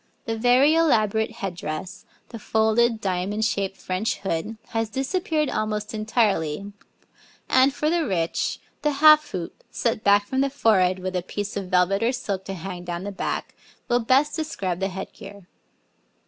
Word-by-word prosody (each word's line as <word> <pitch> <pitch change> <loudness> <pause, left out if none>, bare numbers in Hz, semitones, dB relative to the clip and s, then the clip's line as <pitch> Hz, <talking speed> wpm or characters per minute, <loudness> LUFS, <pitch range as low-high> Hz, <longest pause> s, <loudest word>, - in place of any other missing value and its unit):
The 225 -2 -2
very 250 +6 +4
elaborate 220 -9 +2
head 195 -5 -5
dress, 160 +2 -6 0.2
the 230 - -8
folded, 220 +2 +2
diamond 195 +3 -1
shaped 200 -3 -1
French 185 +5 -2
hood 195 +4 -3
has 225 -1 -1
disappeared 305 - -1
almost 210 -2 -2
entirely, 205 -5 0 0.7
and, 260 +2 +5
for 300 - -2
the 335 +1 +2
rich, 170 -5 -1 0.2
the 300 -1 +1
half 305 +1 +6
hoop, 175 -2 -6
set 230 -2 -1
back 205 0 +4
from 265 +5 -1
the 275 - +2
forehead 190 -9 +3
with 185 0 -4
a 180 - +1
piece 205 +3 -5
of 195 -2 -3
velvet 185 +2 +2
or 235 +3 +2
silk 200 -7 -4
to 195 - -5
hang 180 0 -6
down 175 0 -4
the 205 - -4
back, 195 - -4 0.3
will 240 - +2
best 265 +5 +2
describe 195 - -3
the 195 - 0
head 190 0 -7
gear. 200 -1 -12
210 Hz, 165 wpm, -24 LUFS, 190-245 Hz, 0.7 s, half